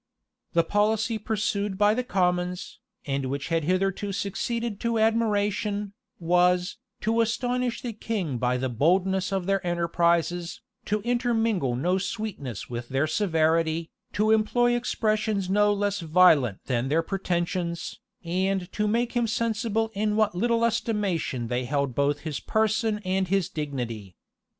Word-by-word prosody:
The 170 - +4
policy 220 +4 +1
pursued 205 -2 -1
by 205 +1 +4
the 250 +3 -1
commons, 180 -4 -1 0.3
and 135 -1 -1
which 140 +4 -4
had 165 -2 0
hitherto 195 +3 0
succeeded 205 +3 -3
to 235 -1 0
admiration, 210 -2 +1 0.3
was, 180 +2 +2 0.2
to 225 +1 +2
astonish 245 +1 -1
the 240 -2 -3
king 195 - -3
by 125 +1 +1
the 130 +1 -1
boldness 185 - +1
of 190 -2 -1
their 195 0 0
enterprises, 170 0 0 0.3
to 210 +1 0
intermingle 225 - +1
no 180 +9 +1
sweetness 185 - -5
with 120 0 -6
their 135 +3 +1
severity, 160 -2 +1 0.2
to 215 +2 +2
employ 240 +3 +3
expressions 215 -5 0
no 205 +1 +4
less 205 0 0
violent 155 - +4
than 125 -1 0
their 160 +3 +2
pretensions, 175 -2 -2 0.2
and 185 +1 -1
to 210 0 -1
make 235 +3 +1
him 240 -2 +1
sensible 225 0 -1
in 210 +1 0
what 215 -1 +2
little 230 +5 +1
estimation 205 - -1
they 125 +1 -1
held 140 -1 -1
both 140 +2 +1
his 155 -3 -4
person 220 0 +1
and 190 0 0
his 195 -1 +1
dignity. 120 - -5
190 Hz, 140 wpm, -26 LUFS, 165-215 Hz, 0.3 s, The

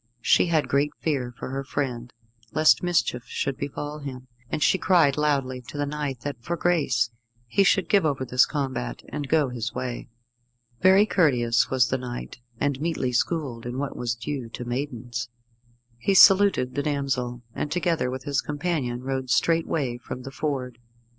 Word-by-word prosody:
She - - +4
had 160 -3 +2
great 140 +2 +2
fear 135 -6 -1
for 125 - -6
her 135 +1 -3
friend, 125 -4 -3 0.4
lest 155 0 +5
mischief 170 -9 0
should 135 - -2
befall 145 +2 -5
him, 130 -3 -8 0.2
and 150 - -1
she 190 - +3
cried 165 -7 +4
loudly 140 -4 0
to 145 - -8
the 145 - 0
knight 145 -4 -4
that, 145 0 -4
for 170 +8 -3
grace, 135 -10 +1 0.3
he 120 - +2
should 195 -2 +3
give 200 +1 +4
over 140 -4 0
this 125 0 +4
combat, 130 - -3
and 145 -2 -4
go 155 -4 +3
his 120 -1 -4
way. 125 -2 -4 0.7
Very 190 +2 +6
courteous 125 - +2
was 130 -2 +3
the 130 - 0
knight, 120 -1 -7 0.2
and 140 -1 0
meetly 160 -6 -1
schooled 125 -2 -1
in 120 +1 -4
what 140 0 -3
was 120 -2 -2
due 120 +1 -5
to 125 +2 -7
maidens. 120 -3 -4 0.7
He 195 +9 +1
saluted 195 -10 +6
the 145 - -1
damsel, 135 -4 -2
and, 145 - -3
together 165 -7 0
with 130 0 -5
his 140 -1 0
companion, 145 -5 -2
rode 130 -1 -3
straightway 145 -1 +1
from 125 +1 -7
the 135 - -7
ford. 130 -4 -3
135 Hz, 170 wpm, -25 LUFS, 125-150 Hz, 0.7 s, Very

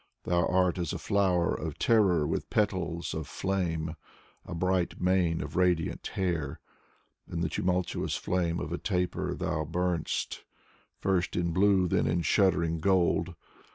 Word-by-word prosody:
Thou 85 0 +1
art 90 0 +2
as 85 -3 -2
a - - -2
flower 95 -4 +1
of - - -4
terror 95 -9 +3
with - - -2
petals 90 -6 -1
of 80 -1 -4
flame, 85 -5 -2 0.5
A 85 - -5
bright 90 +1 0
mane 90 -2 +2
of 75 -1 -6
radiant 90 -3 +1
hair. 85 -7 -1 0.7
In 85 - -2
the 90 - 0
tremulous 90 0 -1
flame 85 -2 -1
of 75 +1 -5
a 85 - -3
taper 90 -3 -1
thou 80 - -1
burn'st 85 +1 -2 0.5
First 95 -2 0
in 85 -1 0
blue, 95 +1 +3
then - - +1
in 85 +1 +1
shuddering 85 -5 +2
gold. 90 -1 +2
90 Hz, 145 wpm, -29 LUFS, 85-95 Hz, 0.7 s, terror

